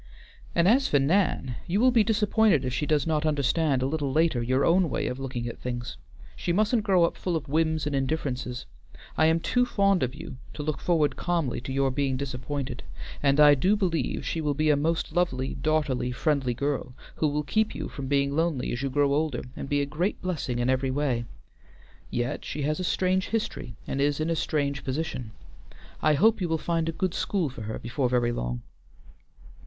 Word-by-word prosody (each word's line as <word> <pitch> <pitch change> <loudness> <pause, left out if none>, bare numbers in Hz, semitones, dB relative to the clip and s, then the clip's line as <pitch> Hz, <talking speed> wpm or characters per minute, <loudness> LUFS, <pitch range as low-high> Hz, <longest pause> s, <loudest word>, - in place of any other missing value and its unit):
"And 170 +1 +4
as 265 +6 +4
for 145 - +3
Nan, 140 -4 +1
you 185 +4 +1
will 255 +2 +5
be 235 -3 +4
disappointed 210 - +3
if 125 - -2
she 150 +3 -1
does 150 -1 +2
not 155 -2 0
understand 145 -2 +1
a - - +1
little 145 -1 -1
later 155 -4 +2
your 130 +3 +1
own 175 0 +3
way - - -1
of 125 - -3
looking 125 -3 -4
at 115 - -6
things. 120 - -4 0.4
She 175 - -2
mustn't 215 +5 +2
grow 190 -4 +3
up 170 - +1
full 180 -2 -2
of 160 - -3
whims 160 +1 +1
and 145 -1 -1
indifferences. 130 -3 -2 0.5
I 155 - +4
am 165 +1 +3
too 245 +8 +1
fond 200 -5 +2
of 125 0 -1
you - - -8 0.2
to 150 - -4
look 155 -1 -2
forward 160 -4 +1
calmly 170 -9 -1
to 130 - -6
your 135 0 +1
being 135 -1 0
disappointed, 135 -1 -4 0.4
and 140 0 +3
I 150 -1 +8
do 180 +10 +3
believe 165 - -1
she 160 +5 -2
will 145 -2 0
be 155 +1 +3
a - - +4
most 160 +3 0
lovely, 135 -8 0
daughterly, 145 -4 0
friendly 135 -2 0
girl, 135 -1 -2 0.2
who 155 - +2
will 150 +1 -1
keep 215 +8 0
you - - -4
from 135 -2 -6
being 140 0 +1
lonely 160 -5 0
as 120 - -3
you 135 - -1
grow 140 +1 +2
older, 150 -3 0
and - - -6
be 145 0 +2
a - - 0
great 160 +8 -2
blessing 155 -9 -2
in 120 0 0
every 130 +1 +1
way. 130 -3 0 0.8
Yet 120 +1 -2
she 145 - -4
has 155 +3 0
a - - -2
strange 185 +1 +1
history, 215 - -3
and 135 - -2
is 145 +1 +1
in 155 +2 0
a - - +1
strange 140 -3 -1
position. 130 -4 -3 0.7
I 155 -1 +4
hope 220 +7 +4
you 175 - 0
will 160 - +1
find 165 0 -1
a - - 0
good 180 +2 -2
school 185 -7 0
for 125 - -9
her 110 +1 -4
before 125 +2 -1
very 120 -1 +2
long." - - -3
145 Hz, 210 wpm, -27 LUFS, 130-170 Hz, 0.8 s, I